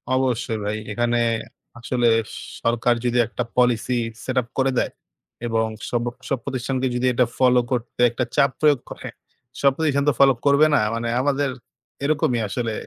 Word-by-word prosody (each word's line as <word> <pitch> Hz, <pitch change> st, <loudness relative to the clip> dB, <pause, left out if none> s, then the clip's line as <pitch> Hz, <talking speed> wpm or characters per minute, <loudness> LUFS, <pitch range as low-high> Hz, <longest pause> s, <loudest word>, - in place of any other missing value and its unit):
অবশ্যই 125 Hz, -3 st, 0 dB
ভাই। 105 Hz, +1 st, -1 dB
এখানে 120 Hz, +2 st, 0 dB, 0.6 s
আসলে 120 Hz, 0 st, 0 dB, 0.5 s
সরকার 120 Hz, +1 st, +2 dB
যদি 120 Hz, 0 st, +1 dB
একটা 125 Hz, +1 st, -3 dB
policy 125 Hz, 0 st, +2 dB, 0.3 s
set 130 Hz, 0 st, -3 dB
up 120 Hz, -, -13 dB
করে 135 Hz, 0 st, +2 dB
দেয় -, -, +1 dB, 0.6 s
এবং 115 Hz, -1 st, +1 dB, 0.2 s
সব 120 Hz, -1 st, 0 dB, 0.3 s
সব 135 Hz, -, +1 dB
প্রতিষ্ঠানকে 130 Hz, +1 st, -2 dB
যদি 125 Hz, +1 st, +1 dB
এটা 125 Hz, 0 st, +3 dB
follow 125 Hz, -1 st, +4 dB
করতে 120 Hz, 0 st, -2 dB
একটা 120 Hz, +2 st, -2 dB
চাপ 140 Hz, -, +4 dB
প্রয়োগ 150 Hz, -4 st, +4 dB
করে, -, -, -7 dB, 0.5 s
সব 140 Hz, -1 st, +5 dB
প্রতিষ্ঠান 145 Hz, -3 st, +1 dB
তো -, -, +2 dB
follow 135 Hz, -2 st, +6 dB
করবে 140 Hz, +2 st, +5 dB
না। -, -, +4 dB, 0.2 s
মানে 115 Hz, 0 st, -2 dB
আমাদের 140 Hz, 0 st, +1 dB, 0.5 s
এরকমই 140 Hz, -5 st, +1 dB
আসলে 115 Hz, +2 st, -2 dB
125 Hz, 160 wpm, -22 LUFS, 120-135 Hz, 0.6 s, follow